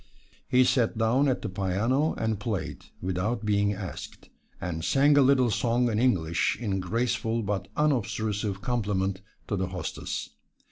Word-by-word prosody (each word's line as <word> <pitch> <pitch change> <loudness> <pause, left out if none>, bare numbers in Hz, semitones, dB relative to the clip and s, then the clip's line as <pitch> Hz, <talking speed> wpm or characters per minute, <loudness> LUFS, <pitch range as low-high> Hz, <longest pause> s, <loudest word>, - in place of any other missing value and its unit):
He 130 0 +5
sat 120 -3 +2
down 120 +6 +3
at 130 - 0
the - - -1
piano 100 - 0
and 110 -2 -1
played, 105 -2 -4 0.2
without 100 +5 -1
being 100 -1 +2
asked, 95 -2 -8 0.3
and 80 -3 -4
sang 140 - +4
a 145 - +6
little 130 -3 +4
song 120 +3 +1
in 105 - 0
English 85 -10 +1
in 100 -5 -1
graceful 115 +3 -1
but 100 -2 -2
unobtrusive 110 -8 0
compliment 100 -5 -1 0.3
to 105 - -1
the 95 -1 -1
hostess. 90 0 -4
110 Hz, 145 wpm, -27 LUFS, 95-125 Hz, 0.3 s, a